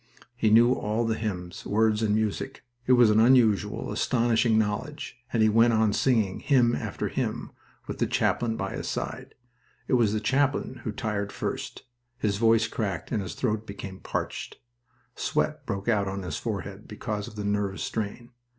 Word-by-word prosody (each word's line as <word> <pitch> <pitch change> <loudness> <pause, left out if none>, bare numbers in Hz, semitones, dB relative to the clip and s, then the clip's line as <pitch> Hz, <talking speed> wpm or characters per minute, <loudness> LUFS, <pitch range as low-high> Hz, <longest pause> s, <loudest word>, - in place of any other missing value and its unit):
He 115 -3 +2
knew 120 +3 +6
all 110 0 -1
the 115 - +1
hymns, 90 -6 -4
words 110 0 +2
and 105 -2 +2
music. 110 -2 -2 0.2
It 130 - +6
was 120 -3 +6
an 105 - +4
unusual, 115 -4 +3
astonishing 115 -1 +2
knowledge, 110 +6 -2
and 115 -2 +2
he - - +6
went 115 +2 +5
on 110 -2 +3
singing, 110 -8 +1
hymn 125 -4 +3
after - - -3
hymn, - - -3 0.3
with - - -6
the - - +2
chaplain 115 -2 0
by 95 - -3
his - - -5
side. - - -5 0.5
It - - -1
was 115 -5 +4
the 110 - 0
chaplain 135 +1 0
who 110 - -1
tired 105 -4 -3
first. - - -4 0.3
His 105 -5 0
voice 115 0 +4
cracked 95 -6 -3
and 105 - 0
his 95 - -6
throat 110 -3 -1
became 100 -1 -7
parched. - - -4 0.6
Sweat - - -1
broke 100 +1 -3
out 105 -4 +2
on 95 0 -4
his 80 -4 -4
forehead, 100 -2 -5
because 105 -1 -4
of - - -11
the 105 -1 -4
nervous 100 -1 -1
strain. 115 +3 -4
110 Hz, 175 wpm, -27 LUFS, 100-120 Hz, 0.6 s, knew